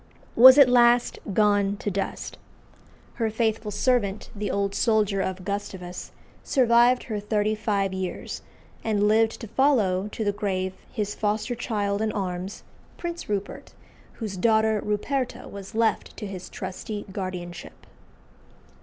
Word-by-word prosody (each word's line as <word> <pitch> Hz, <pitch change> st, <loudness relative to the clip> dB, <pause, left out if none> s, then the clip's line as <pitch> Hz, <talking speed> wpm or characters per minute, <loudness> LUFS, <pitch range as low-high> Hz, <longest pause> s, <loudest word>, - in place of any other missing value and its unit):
was 260 Hz, +3 st, +10 dB
at 280 Hz, -3 st, +9 dB
"last 240 Hz, -1 st, +4 dB
gone 205 Hz, 0 st, +2 dB
to 205 Hz, -, -3 dB
dust." 195 Hz, +1 st, -4 dB, 0.8 s
Her 225 Hz, -, +2 dB
faithful 220 Hz, -1 st, -1 dB
servant, 210 Hz, -3 st, 0 dB
the 205 Hz, -1 st, -3 dB
old 200 Hz, 0 st, -1 dB
soldier 210 Hz, -3 st, +2 dB
of 190 Hz, -1 st, -4 dB
Gustavus, 190 Hz, -3 st, -5 dB, 0.3 s
survived 245 Hz, -1 st, +4 dB
her 215 Hz, -3 st, -4 dB
thirty 210 Hz, +1 st, 0 dB
five 205 Hz, -3 st, -1 dB
years, 190 Hz, -1 st, -5 dB, 0.4 s
and 210 Hz, -2 st, +1 dB
lived 220 Hz, +1 st, +3 dB
to 225 Hz, -, -6 dB
follow 210 Hz, -7 st, +2 dB
to 215 Hz, +1 st, -4 dB
the 205 Hz, -, +1 dB
grave 190 Hz, -2 st, -2 dB, 0.2 s
his 205 Hz, -1 st, -2 dB
foster 215 Hz, +3 st, -1 dB
child 205 Hz, -4 st, -2 dB
in 220 Hz, 0 st, 0 dB
arms, 185 Hz, 0 st, -4 dB, 0.3 s
Prince 340 Hz, -6 st, -5 dB
Rupert, 200 Hz, -1 st, -4 dB, 0.4 s
whose 210 Hz, -5 st, -6 dB
daughter 220 Hz, 0 st, +3 dB
Ruperta 250 Hz, +5 st, -2 dB
was 200 Hz, +2 st, -9 dB
left 225 Hz, -1 st, 0 dB
to -, -, -5 dB
his 190 Hz, -2 st, -7 dB
trusty 205 Hz, +3 st, -6 dB
guardianship. 180 Hz, -3 st, -7 dB
210 Hz, 135 wpm, -25 LUFS, 195-225 Hz, 0.8 s, was